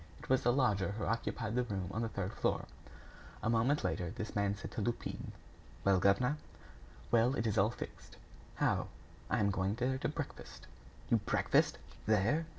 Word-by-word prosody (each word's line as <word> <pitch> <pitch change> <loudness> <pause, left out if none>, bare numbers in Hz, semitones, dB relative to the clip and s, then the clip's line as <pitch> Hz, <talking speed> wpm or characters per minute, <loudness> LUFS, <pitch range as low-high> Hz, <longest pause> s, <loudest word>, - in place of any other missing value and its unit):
It - - -12
was 130 0 +4
the 120 - +4
lodger 105 -7 +2
who 110 - -2
occupied 115 -1 -1
the 125 - +2
room 95 -5 -3
on 110 - -2
the 115 - -1
third 100 -2 -3
floor. - - 0 0.8
A 110 - +2
moment 120 +6 +2
later, 90 - -1
this 110 +2 -6
man 100 -1 +1
said - - -7
to 115 - -3
Lupin: 120 +3 -3 0.5
"Well, 95 -1 +4
governor?" 125 +10 +3 0.7
"Well, 120 +3 +4
it 115 - -1
is 110 - +1
all 100 +3 +5
fixed." 120 - -8 0.4
"How?" - - +1 0.4
"I - - +2
am 100 -1 +3
going 95 +1 0
there 130 +2 0
to - - 0
breakfast." - - -6 0.5
"You - - +6
breakfast - - +2 0.3
there!" 110 +10 +3
110 Hz, 175 wpm, -34 LUFS, 100-120 Hz, 0.8 s, You